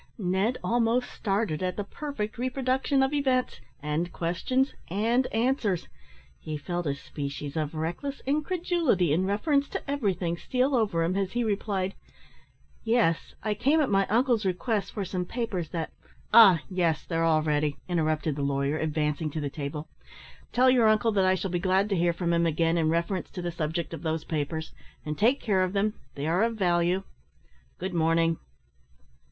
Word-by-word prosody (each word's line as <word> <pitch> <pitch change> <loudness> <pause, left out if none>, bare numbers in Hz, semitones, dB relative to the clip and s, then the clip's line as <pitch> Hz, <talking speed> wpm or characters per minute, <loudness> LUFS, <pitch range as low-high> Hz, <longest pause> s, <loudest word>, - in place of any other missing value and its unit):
Ned 195 +4 0
almost 240 +1 +1
started 195 -5 -1
at 185 0 -2
the 205 - -1
perfect 230 -1 -5
reproduction 260 +2 +1
of 265 +2 0
events, 260 - 0 0.2
and 155 +4 -1
questions, 255 +11 0 0.2
and 230 +7 +1
answers. 225 -6 0 0.5
He 155 -1 -5
felt 175 +3 -3
a 140 - 0
species 140 0 -6
of 155 -1 -2
reckless 170 - -3
incredulity 305 - +1
in 185 +4 +1
reference 280 +8 +1
to - - -5
everything 190 - -1
steal 260 +7 0
over 205 -9 +2
him, 175 +3 0
as 195 -1 -1
he 240 0 +1
replied 200 -3 -1 0.9
"Yes; 225 -8 +1
I 215 - 0
came, 280 +9 +2
at 290 -7 +1
my 195 0 +3
uncle's 235 0 +2
request, 200 +3 -1
for 200 -3 -3
some 185 -1 -2
papers 185 -5 -3
that 165 -2 -4 0.2
" - - -31
"Ah, 190 -9 +8
yes, 175 -4 0
they're 165 -1 -1
all 160 -1 +3
ready," 150 -1 0
interrupted 155 -3 0
the 145 - -3
lawyer, 140 +2 0
advancing 155 0 -1
to 155 - -4
the 145 -2 -3
table. 150 +1 -5 0.6
"Tell 255 +1 +5
your 240 -3 +5
uncle 215 +1 +3
that 195 -3 +2
I 185 0 +4
shall 190 0 -3
be 175 - 0
glad 190 +2 +2
to 200 - +1
hear 170 0 +2
from 170 0 -1
him 170 0 +3
again 165 +1 +1
in 160 -2 +2
reference 170 +3 -1
to 180 - -6
the 175 - -2
subject 160 0 -3
of - - -6
those 160 -1 -2
papers; 160 +1 -3 0.3
and 150 0 -2
take 235 - +3
care 195 -4 +1
of 185 0 0
them 210 +1 +1 0.2
they 140 - -4
are 170 +5 +2
of 230 0 +1
value. 180 -1 +1 0.7
Good 185 +1 -4
morning!" 165 0 +2
185 Hz, 175 wpm, -27 LUFS, 165-230 Hz, 0.9 s, Ah